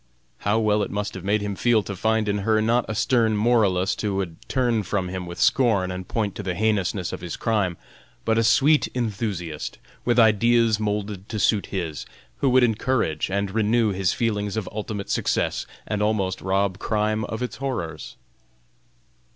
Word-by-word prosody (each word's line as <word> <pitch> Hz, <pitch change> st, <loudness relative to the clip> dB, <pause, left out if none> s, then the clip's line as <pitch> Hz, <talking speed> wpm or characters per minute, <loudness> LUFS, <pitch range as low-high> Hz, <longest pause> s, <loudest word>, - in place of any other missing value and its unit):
How 105 Hz, +2 st, +1 dB
well 105 Hz, -1 st, +2 dB
it 100 Hz, -, -1 dB
must 105 Hz, 0 st, -3 dB
have 95 Hz, -, -7 dB
made 105 Hz, +2 st, +1 dB
him 100 Hz, -1 st, -3 dB
feel 115 Hz, 0 st, +2 dB
to 100 Hz, -, -5 dB
find 110 Hz, +2 st, +1 dB
in 100 Hz, 0 st, 0 dB
her 110 Hz, +2 st, +2 dB
not 115 Hz, +3 st, +2 dB
a 110 Hz, -, -2 dB
stern 110 Hz, -1 st, +2 dB
moralist 105 Hz, -4 st, +2 dB
who 105 Hz, -2 st, -1 dB
would 95 Hz, -4 st, -3 dB
turn 120 Hz, -4 st, +1 dB
from 95 Hz, -1 st, -2 dB
him 90 Hz, -1 st, -5 dB
with 85 Hz, -, -8 dB
scorn 105 Hz, -8 st, +3 dB
and 90 Hz, 0 st, -6 dB
point 105 Hz, -4 st, -1 dB
to -, -, -6 dB
the 95 Hz, -3 st, -3 dB
heinousness 100 Hz, -3 st, 0 dB
of -, -, -6 dB
his 85 Hz, -2 st, -5 dB
crime, 100 Hz, -7 st, 0 dB, 0.5 s
but 110 Hz, -, +2 dB
a -, -, +3 dB
sweet 135 Hz, +7 st, +4 dB
enthusiast, 100 Hz, -9 st, -3 dB, 0.3 s
with 120 Hz, -1 st, +1 dB
ideas 115 Hz, 0 st, +4 dB
moulded 105 Hz, -2 st, -3 dB
to 110 Hz, -, -3 dB
suit 105 Hz, 0 st, +2 dB
his, 85 Hz, -6 st, -4 dB, 0.3 s
who 135 Hz, -, +2 dB
would 130 Hz, 0 st, +5 dB
encourage 115 Hz, -, 0 dB
and 100 Hz, 0 st, -1 dB
renew 110 Hz, +1 st, +2 dB
his 95 Hz, -2 st, +1 dB
feelings 105 Hz, -3 st, -1 dB
of 105 Hz, -4 st, -2 dB
ultimate 105 Hz, -1 st, -5 dB
success -, -, 0 dB, 0.2 s
and 105 Hz, -1 st, -2 dB
almost 100 Hz, -3 st, 0 dB
rob 95 Hz, 0 st, 0 dB
crime 110 Hz, 0 st, 0 dB
of 110 Hz, +3 st, -4 dB
its 125 Hz, -, -5 dB
horrors! 105 Hz, -, -4 dB
105 Hz, 180 wpm, -24 LUFS, 95-115 Hz, 0.5 s, would